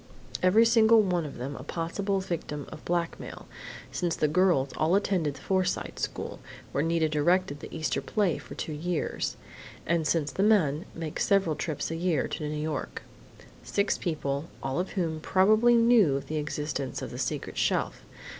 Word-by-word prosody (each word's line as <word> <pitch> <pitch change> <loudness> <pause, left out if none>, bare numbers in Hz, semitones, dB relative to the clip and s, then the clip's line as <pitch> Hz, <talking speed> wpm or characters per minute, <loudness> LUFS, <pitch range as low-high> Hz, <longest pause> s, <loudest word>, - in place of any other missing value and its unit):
Every 200 +5 +5
single 225 -1 +6
one 175 -5 0
of 140 - -9
them 135 +4 -5
a - - -7
possible 190 +7 -2
victim 155 -5 -4
of - - -10
blackmail, 170 -1 -3 0.5
since 175 -2 -1
the 155 - +2
girls 155 -4 +3
all 160 +4 +2
attended 180 -8 +1
the - - -12
Forsyte 185 -1 -1
School, - - -4 0.3
where 140 - 0
Nita 165 -1 +2
directed 155 0 +1
the - - -9
Easter 155 -5 -1
play 200 -7 0
for - - -10
two 155 - -4
years, 165 +2 -2 0.5
and 165 -2 +1
since 150 -2 +1
the 190 - -2
men 185 -7 +3
make 165 -2 -5
several 195 -6 +2
trips 160 0 -3
a - - -2
year 165 -4 0
to 150 -1 -3
New 150 - -3
York.... 150 0 -4 0.6
Six 200 0 0
people, 145 -4 -2 0.2
all 135 +4 -1
of 185 - -3
whom 165 -5 -1
probably 215 +8 +4
knew 230 - +5
of 140 - -6
the 155 - -3
existence 150 -2 -3
of - - -6
the - - -7
secret - - -3
shelf.... - - 0
165 Hz, 175 wpm, -28 LUFS, 150-190 Hz, 0.6 s, single